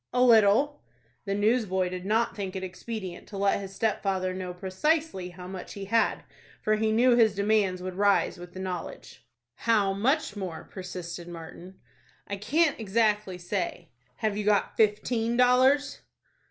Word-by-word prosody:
"A 250 Hz, 0 st, +3 dB
little." 235 Hz, +5 st, +4 dB, 0.4 s
The 195 Hz, -1 st, -1 dB
newsboy 205 Hz, -4 st, +1 dB
did 185 Hz, +1 st, -6 dB
not 225 Hz, +2 st, +1 dB
think 195 Hz, -2 st, -5 dB
it 190 Hz, -, -4 dB
expedient 190 Hz, 0 st, -6 dB
to 200 Hz, -, -8 dB
let 195 Hz, 0 st, +2 dB
his 195 Hz, -1 st, -8 dB
stepfather 195 Hz, -4 st, 0 dB
know 185 Hz, -1 st, -5 dB
precisely 190 Hz, -, -1 dB
how 180 Hz, 0 st, -11 dB
much 185 Hz, -1 st, -7 dB
he 200 Hz, -1 st, -6 dB
had, 225 Hz, +3 st, +1 dB, 0.4 s
for 215 Hz, -, +2 dB
he 220 Hz, 0 st, +1 dB
knew 240 Hz, +3 st, +4 dB
his 220 Hz, -4 st, +4 dB
demands 200 Hz, -3 st, +1 dB
would 185 Hz, 0 st, -4 dB
rise 200 Hz, -1 st, +2 dB
with 175 Hz, 0 st, -10 dB
the 185 Hz, -, -8 dB
knowledge. 185 Hz, -1 st, -6 dB, 0.3 s
"How 210 Hz, -4 st, +1 dB
much 240 Hz, +4 st, 0 dB
more?" 185 Hz, -5 st, -5 dB
persisted 180 Hz, -2 st, -7 dB
Martin. 175 Hz, +2 st, -10 dB, 0.5 s
"I 200 Hz, -, -4 dB
can't 290 Hz, +10 st, +1 dB
exactly 210 Hz, -3 st, +1 dB
say." 175 Hz, -2 st, -4 dB, 0.3 s
"Have 215 Hz, -, -1 dB
you 210 Hz, -, -2 dB
got 205 Hz, -1 st, +1 dB
fifteen 225 Hz, +2 st, +1 dB
dollars?" 260 Hz, +3 st, +4 dB
200 Hz, 155 wpm, -27 LUFS, 185-225 Hz, 0.5 s, little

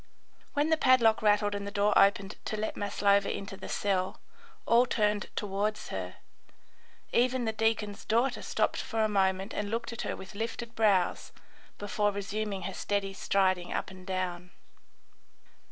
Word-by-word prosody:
When 295 Hz, +2 st, +1 dB
the 320 Hz, -, +4 dB
padlock 245 Hz, -6 st, +4 dB
rattled 205 Hz, -1 st, +3 dB
and 200 Hz, 0 st, -4 dB
the -, -, -2 dB
door 205 Hz, 0 st, +2 dB
opened 200 Hz, 0 st, +4 dB
to 215 Hz, -, -3 dB
let 215 Hz, +1 st, -2 dB
Maslova 200 Hz, 0 st, +2 dB
into 200 Hz, 0 st, -5 dB
the 190 Hz, -, -9 dB
cell, 190 Hz, -2 st, -1 dB, 0.5 s
all 240 Hz, +2 st, +5 dB
turned 210 Hz, -3 st, 0 dB
towards 205 Hz, +1 st, -2 dB
her. 90 Hz, -1 st, -5 dB, 1.0 s
Even 250 Hz, 0 st, +2 dB
the 220 Hz, -, +1 dB
deacon's 220 Hz, -2 st, -1 dB
daughter 245 Hz, +4 st, +1 dB
stopped -, -, 0 dB
for 225 Hz, -1 st, -1 dB
a -, -, +3 dB
moment 195 Hz, 0 st, +1 dB
and 205 Hz, 0 st, -3 dB
looked 235 Hz, +2 st, -3 dB
at 235 Hz, -, -5 dB
her -, -, -3 dB
with 190 Hz, -, -10 dB
lifted 230 Hz, +2 st, -4 dB
brows 205 Hz, -6 st, +2 dB, 0.5 s
before 205 Hz, 0 st, 0 dB
resuming 200 Hz, 0 st, -3 dB
her 195 Hz, -, -4 dB
steady 200 Hz, 0 st, -2 dB
striding 185 Hz, -2 st, +1 dB
up -, -, -3 dB
and 185 Hz, -1 st, -13 dB
down. 180 Hz, -1 st, -3 dB
205 Hz, 155 wpm, -30 LUFS, 195-220 Hz, 1.0 s, all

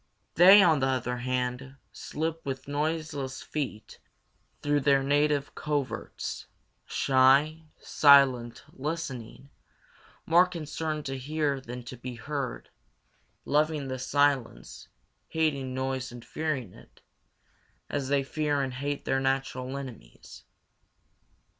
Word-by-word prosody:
They, 190 Hz, +4 st, +8 dB
on 160 Hz, -5 st, +4 dB
the 135 Hz, -, +1 dB
other 125 Hz, -2 st, -1 dB
hand, 125 Hz, +1 st, -3 dB, 0.2 s
slip 160 Hz, +1 st, -4 dB
with 135 Hz, -1 st, -5 dB
noiseless 145 Hz, -2 st, -3 dB
feet 135 Hz, -8 st, -5 dB, 0.6 s
through 145 Hz, 0 st, +2 dB
their 140 Hz, -1 st, +3 dB
native 145 Hz, 0 st, +1 dB
coverts, 145 Hz, -3 st, -4 dB, 0.4 s
shy, 140 Hz, +4 st, +3 dB
silent, 135 Hz, -5 st, +4 dB
listening, 140 Hz, -3 st, -6 dB, 0.7 s
more 175 Hz, +2 st, +5 dB
concerned 155 Hz, -3 st, -4 dB
to 135 Hz, -1 st, -4 dB
hear 145 Hz, 0 st, -1 dB
than 125 Hz, 0 st, -8 dB
to 125 Hz, +1 st, -9 dB
be 125 Hz, +1 st, -7 dB
heard, 135 Hz, +2 st, -5 dB, 0.7 s
loving 150 Hz, -1 st, +1 dB
the 130 Hz, 0 st, -4 dB
silence, 135 Hz, -, 0 dB, 0.4 s
hating 145 Hz, -5 st, -1 dB
noise 130 Hz, -1 st, -3 dB
and 120 Hz, -1 st, -11 dB
fearing 140 Hz, -, -3 dB
it, -, -, -18 dB, 0.9 s
as 140 Hz, -2 st, -3 dB
they 140 Hz, 0 st, +2 dB
fear 145 Hz, 0 st, -1 dB
and 130 Hz, -1 st, -4 dB
hate 140 Hz, +2 st, -4 dB
their 135 Hz, -, +1 dB
natural 135 Hz, 0 st, -2 dB
enemies. 120 Hz, -, -11 dB
140 Hz, 110 wpm, -28 LUFS, 130-150 Hz, 0.9 s, They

